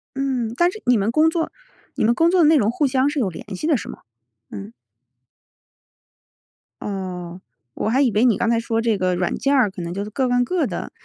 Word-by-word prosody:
嗯， 260 -4 -2
但 345 +6 +3
是 435 - -10
你 245 -1 +4
们 205 +2 0
工 310 +5 +4
作 325 0 -2 0.4
你 - - -1
们 230 +2 +4
工 330 +5 +3
作 370 - +3
的 - - +5
内 320 - +5
容 220 -8 +3
互 285 +4 +1
相 265 +1 +1
是 295 0 -3
有 215 -7 0
联 185 +2 -8
系 245 - -4
的 310 -4 +3
是 - - -7
吗？ - - -9 0.5
嗯。 100 +1 -8 2.1
哦， 185 -3 -6 0.3
我 - - -2
还 255 +5 +2
以 260 -4 +3
为 215 +4 +2
你 235 -5 +3
刚 235 - 0
才 230 -1 +2
说 230 0 -1
这 225 -2 +1
个 185 -1 0
软 175 0 -1
件 280 +1 +1
儿 245 -7 +3
可 190 -2 -8
能 170 0 -5
就 200 +2 -3
是 210 - -7
各 255 +4 -1
干 245 0 +2
各 355 +6 0
的。 - - -5
235 Hz, 250 characters per minute, -21 LUFS, 200-275 Hz, 2.1 s, 的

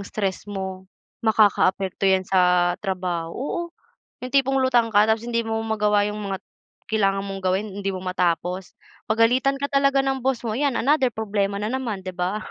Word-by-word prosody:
stress 200 -1 -4
mo 190 -2 -6 0.3
makakaapekto 195 -3 +2
'yan 190 -1 +3
sa 180 -1 +3
trabaho, 180 -4 -2
oo, 280 +7 -3 0.6
yung 255 - -7
tipong 270 -1 +3
lutang 240 -3 +2
ka 210 0 +5
tapos 220 0 +1
hindi 235 0 -1
mo 225 0 -3
magawa 210 -2 +2
yung 210 0 -4
mga 195 -2 -3 0.5
kailangan 195 -2 +1
mong 195 -1 -6
gawin. 190 +3 0
Hindi 195 -1 -2
mo 185 - -6
matapos, 180 0 -1 0.3
pagalitan 245 +5 +3
ka 280 +1 -4
talaga 275 -1 +3
ng 270 0 -1
boss 255 -1 -1
mo, 225 - -2
'yan 275 +4 0
another 275 +1 +3
problema 200 -2 -1
na 215 - -2
naman, 235 -7 -3
'di 185 - -5
ba? 185 +4 -2
210 Hz, 175 wpm, -23 LUFS, 190-240 Hz, 0.6 s, ka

